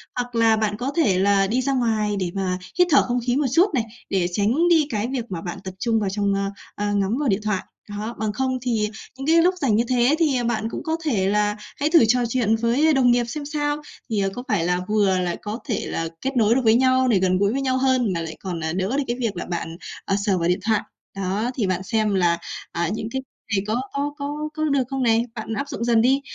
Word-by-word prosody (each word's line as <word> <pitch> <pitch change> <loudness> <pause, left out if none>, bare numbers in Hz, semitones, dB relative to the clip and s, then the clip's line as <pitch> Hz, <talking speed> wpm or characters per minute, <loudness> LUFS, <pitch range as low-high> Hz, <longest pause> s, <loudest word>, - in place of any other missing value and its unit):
hoặc 245 -1 -3
là 225 -1 +4
bạn 210 -1 -1
có 260 +4 -2
thể 200 - +3
là 195 0 +3
đi 250 +5 +1
ra 275 +1 0
ngoài 220 -4 +1
để 180 -2 -2
mà 185 -2 -1 0.2
hít 360 - +6
thở 280 - +7
không 245 0 0
khí 245 - +2
một 290 +1 +1
chút 350 +3 +4
này, 245 - +1 0.3
để 185 -3 +1
tránh 225 - +2
đi 320 -4 +4
cái 220 -2 -1
việc 255 -3 -3
mà 170 -3 -4
bạn 175 - -6
tập 190 -1 -6
trung 225 0 +1
vào 200 -3 -1
trong, 200 0 0
ơ, 195 0 -1 0.3
ơ, 205 0 -1
ngắm 200 +4 +1
vào 290 -5 +1
điện 195 +2 +1
thoại. 210 -3 -1 0.3
Đó, 210 +3 -5
bằng 215 -1 -1
không 260 +2 -1
thì 225 -4 0 0.3
những 270 +2 -5
cái 330 +1 +5
lúc 365 +2 +3
rảnh 230 -7 +2
như 230 - +3
thế 250 +3 +3
thì, 310 -5 +3
à, 245 - -1
bạn 225 -2 -1
cũng - - -6
có 320 0 -1
thể 200 -10 +1
là 210 0 +1 0.2
hãy 290 +2 +1
thử 325 -7 +6
trò 250 +2 +3
chuyện 230 -3 +2
với 245 +8 +2
đồng 250 -3 +4
nghiệp 240 0 +3
xem 285 +5 -5
sao. 290 0 -1 0.3
Thì, 215 - 0
ờ, 195 -1 +1
có 245 - -6
phải 205 -6 +1
là 180 0 +1
vừa 205 -3 +3
là 175 -1 -1
có 210 +4 -5
thể 220 - -1
là 165 - -2
kết 270 0 -2
nối 225 0 +4
được 265 - +2
với 220 0 +5
nhau 260 +1 +3
để 215 -6 +3
gần 185 0 +2
gũi 200 +1 +2
với 275 - -1
nhau 260 -1 +1
hơn, 255 -6 +2
mà 170 - -2
lại 160 -1 -6
còn, 180 -3 -4
à, 160 +1 -1
đỡ 190 +8 -1
được 290 - +1
cái 240 - -2
việc 230 -4 -1
là 175 - -4
bạn, 170 -1 -4 0.3
ờ, 195 - +1
sờ 195 -3 +2
vào 170 - 0
điện 180 +2 +1
thoại. 220 -2 +3 0.3
Đó, 195 +5 -1
thì 220 -7 0
bạn 185 0 -1
xem 215 0 0
là, 170 -2 +3 0.3
à, 170 -1 -1
những 220 0 -4
cái 265 - -2 0.3
này 195 - 0
có 230 +4 0
có 285 +1 -2
có 295 +1 -4
có 310 0 -3
được 280 -3 +2
không 270 -1 -2
này? 230 -1 +3
Bạn 225 0 -5
áp 280 +6 -3
dụng 245 -5 -4
dần 230 -2 +3
đi. 265 +3 +3
225 Hz, 270 wpm, -23 LUFS, 200-260 Hz, 0.3 s, thở